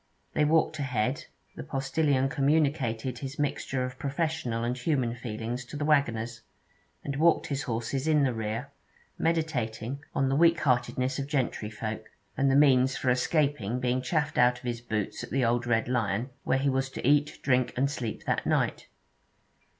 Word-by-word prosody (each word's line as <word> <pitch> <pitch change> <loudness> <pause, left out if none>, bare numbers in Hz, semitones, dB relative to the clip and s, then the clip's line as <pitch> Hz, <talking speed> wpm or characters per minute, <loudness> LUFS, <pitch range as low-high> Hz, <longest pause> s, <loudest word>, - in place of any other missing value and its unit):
They 150 - +3
walked 155 0 +2
ahead; 130 -1 -1 0.3
the - - -6
postillion 135 0 +1
communicated 135 -4 0
his 135 0 -6
mixture 135 -2 -1
of 130 0 -8
professional 140 -5 -2
and 120 +1 -1
human 125 -3 0
feelings 120 +1 -5
to 145 - -7
the 150 - -2
waggoners, 120 -6 +1 0.6
and 140 -1 -3
walked 165 +2 +4
his 140 -1 -2
horses 125 +3 -2
in 150 -2 +4
the 130 -2 +2
rear, 110 +4 -4 0.5
meditating 140 -6 -1
on 135 - +2
the 135 - +1
weak 170 +2 +5
heartedness 130 0 +1
of 135 - -3
gentryfolk, 110 -6 -3 0.3
and 135 0 +2
the 135 - +3
means 130 -2 +5
for 125 - +1
escaping 125 -3 +1
being 125 0 0
chaffed 150 +1 0
out 125 0 +5
of 125 - -15
his 120 -1 -3
boots 110 -4 -3
at - - -7
the 130 -1 +1
Old 120 +1 +1
Red 115 -1 +2
Lion, 115 0 -1
where 135 - +2
he 135 +1 0
was 135 0 +1
to 130 - -4
eat, 145 +1 +3
drink, 130 -2 +2
and 140 +2 +2
sleep 120 -6 -4
that - - 0
night. - - 0
130 Hz, 170 wpm, -28 LUFS, 120-145 Hz, 0.6 s, weak